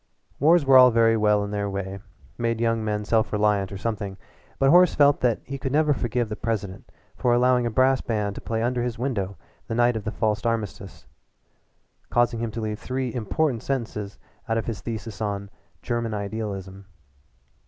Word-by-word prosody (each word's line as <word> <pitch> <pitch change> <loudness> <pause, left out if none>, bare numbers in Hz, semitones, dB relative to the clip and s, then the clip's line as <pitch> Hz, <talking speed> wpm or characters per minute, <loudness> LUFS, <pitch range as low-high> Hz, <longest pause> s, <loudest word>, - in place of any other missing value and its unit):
Wars 160 +2 +4
were 135 -1 +8
all 125 0 +9
very 115 -1 +4
well 105 -1 +3
in 100 - -5
their 100 -1 -2
way, 100 0 -4 0.4
made 115 -1 -1
young 115 -1 +1
men 105 -1 -2
self 110 0 +1
reliant 105 -2 +1
or 100 - -5
something 100 -2 -4 0.4
but 135 0 +4
Horace 180 +1 +6
felt 145 -1 +4
that 120 -3 +1
he 140 0 -6
could 135 0 -3
never 150 +1 +3
forgive 120 -2 -1
the 105 - -5
President 100 -5 -4 0.2
for 120 -1 +2
allowing 125 0 +3
a - - 0
brass 130 +3 +3
band 105 -3 -2
to - - -8
play 115 0 -2
under 120 +1 0
his 120 -1 -3
window 105 -7 -2 0.3
the 115 - -3
night 120 0 +3
of 110 - -3
the 110 - -2
false 110 -1 -1
armistice, 105 -5 -3 1.0
causing 120 -1 +1
him 115 0 -2
to 115 +1 -5
leave 105 -1 -3
three 130 -2 -3
important 125 +2 -1
sentences 110 -6 -4 0.3
out 115 - +1
of 115 - -2
his 110 -5 -4
thesis 115 -1 -6
on 100 -1 -3 0.3
"German 115 -2 -2
Idealism." 100 -2 -5
115 Hz, 185 wpm, -24 LUFS, 105-125 Hz, 1.0 s, all